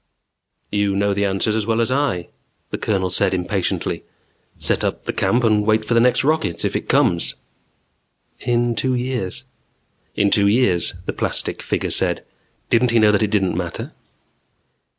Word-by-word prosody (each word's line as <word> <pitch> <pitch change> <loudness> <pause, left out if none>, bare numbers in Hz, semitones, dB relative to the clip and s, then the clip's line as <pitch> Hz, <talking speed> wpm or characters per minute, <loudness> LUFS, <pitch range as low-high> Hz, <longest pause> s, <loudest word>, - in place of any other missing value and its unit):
"You 100 -1 +1
know 100 0 +1
the 100 +1 0
answers 100 +2 0
as 110 -1 -1
well 115 0 +1
as 115 +2 +1
I," 130 -11 0 0.4
the - - -3
Colonel 95 -4 0
said 95 +2 +2
impatiently. 90 +1 -2 0.5
"Set - - 0
up - - -2
the - - -2
camp 120 +1 +1
and 105 -2 +3
wait 110 0 +2
for 120 - 0
the 115 - +5
next 125 +2 +3
rocket. 155 - 0
If - - -1
it - - -3
comes." 85 -1 +2 1.0
"In 120 -1 +1
two 130 +2 0
years." 125 -2 -3 0.7
"In 100 0 +2
two 100 -1 +4
years," 100 -7 +2
the - - -3
plastic - - -1
figure - - -2
said. - - 0 0.5
Didn't 120 +1 +4
he 115 - +3
know 105 -1 +5
that 105 - +2
it 105 - +1
didn't 95 -5 +1
matter? 85 -1 -4
105 Hz, 170 wpm, -20 LUFS, 95-120 Hz, 1.0 s, the